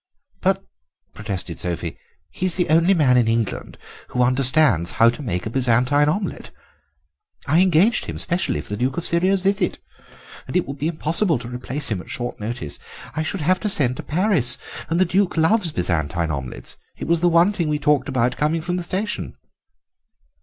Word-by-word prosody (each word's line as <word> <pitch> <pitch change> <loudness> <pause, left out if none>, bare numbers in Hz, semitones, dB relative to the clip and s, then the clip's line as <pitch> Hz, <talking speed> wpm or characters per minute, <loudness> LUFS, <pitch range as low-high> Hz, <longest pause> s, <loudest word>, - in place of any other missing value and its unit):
"But," 195 +1 +1 0.5
protested 95 -5 -5
Sophie, 85 -1 -4 0.4
"he 185 - -2
is 180 - -1
the 180 - 0
only 170 +5 +4
man 130 -6 +4
in 120 -2 +3
England 115 -2 -2 0.3
who 125 - 0
understands 125 - +3
how 115 - +6
to 120 +5 -5
make 90 -9 -3
a - - -2
Byzantine 130 +4 +2
omelette. 195 +5 -3 1.0
I 155 +5 +3
engaged 185 +5 +3
him - - -6
specially 175 - 0
for - - -13
the 105 - -3
Duke 130 +7 -1
of 170 - -2
Syria's 185 +3 +2
visit, 195 +2 0 0.7
and - - -7
it 180 - 0
would 140 0 -7
be 150 - -1
impossible 165 +1 +2
to 120 0 -8
replace 125 +4 -4
him 100 -5 -2
at - - -15
short 120 0 -4
notice. 110 - -4 0.4
I 155 - -1
should 160 +3 -3
have 180 +4 +2
to 210 - -1
send 130 -9 +3
to - - -4
Paris, 160 - +2 0.3
and 165 +2 0
the 185 - +4
Duke 185 0 0
loves 175 +2 +2
Byzantine 85 - -1
omelettes. 70 -3 -6 0.2
It - - -6
was 170 0 +2
the 175 - +4
one 170 +4 +4
thing 170 -6 -1
we 150 - +1
talked 150 -1 +1
about 125 -2 0
coming 155 +2 0
from 175 +2 -2
the - - -2
station." 195 +4 -3
150 Hz, 190 wpm, -21 LUFS, 120-175 Hz, 1.0 s, how